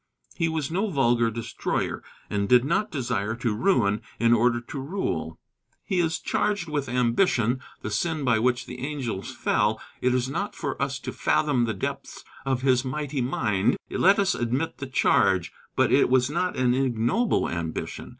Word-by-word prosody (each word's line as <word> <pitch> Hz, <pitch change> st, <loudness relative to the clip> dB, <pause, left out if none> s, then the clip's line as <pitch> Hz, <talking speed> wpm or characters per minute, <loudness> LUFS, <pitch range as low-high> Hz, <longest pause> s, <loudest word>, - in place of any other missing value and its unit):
He 165 Hz, -2 st, 0 dB
was 160 Hz, -2 st, -2 dB
no 195 Hz, +5 st, 0 dB
vulgar 120 Hz, -7 st, +2 dB
destroyer, 115 Hz, 0 st, -3 dB, 0.3 s
and 100 Hz, -1 st, -1 dB
did 125 Hz, 0 st, +6 dB
not 190 Hz, +8 st, +1 dB
desire 120 Hz, -, -2 dB
to 115 Hz, -2 st, -1 dB
ruin 105 Hz, -, +2 dB, 0.2 s
in 115 Hz, 0 st, +4 dB
order 120 Hz, +1 st, +3 dB
to 120 Hz, +4 st, -7 dB
rule. 170 Hz, +9 st, -3 dB, 0.5 s
He 190 Hz, -3 st, -1 dB
is 165 Hz, -1 st, +1 dB
charged 205 Hz, -5 st, -1 dB
with 145 Hz, -4 st, -2 dB
ambition, 125 Hz, -, +2 dB, 0.2 s
the 110 Hz, -, -3 dB
sin 155 Hz, +7 st, -1 dB
by 120 Hz, -4 st, +3 dB
which 125 Hz, +2 st, +1 dB
the 125 Hz, -, -8 dB
angels 130 Hz, -8 st, -4 dB
fell. 110 Hz, -3 st, +1 dB, 0.2 s
It 125 Hz, 0 st, +2 dB
is 125 Hz, 0 st, 0 dB
not 200 Hz, +10 st, -3 dB
for 140 Hz, -4 st, -4 dB
us 140 Hz, -1 st, -1 dB
to -, -, -6 dB
fathom 130 Hz, -6 st, +2 dB
the 110 Hz, -2 st, -2 dB
depths 95 Hz, -, -5 dB, 0.2 s
of 130 Hz, -1 st, 0 dB
his 130 Hz, -2 st, +3 dB
mighty 140 Hz, +1 st, -3 dB
mind. 105 Hz, -5 st, +1 dB
Let 195 Hz, +2 st, +4 dB
us 200 Hz, -1 st, +2 dB
admit 125 Hz, +7 st, -2 dB
the 140 Hz, -, -5 dB
charge. 95 Hz, -8 st, +2 dB, 0.2 s
But -, -, +3 dB
it -, -, +4 dB
was 130 Hz, +1 st, +3 dB
not 180 Hz, +3 st, -1 dB
an 125 Hz, -1 st, +3 dB
ignoble 130 Hz, -, +1 dB
ambition. 85 Hz, -1 st, -4 dB
125 Hz, 170 wpm, -25 LUFS, 115-150 Hz, 0.5 s, did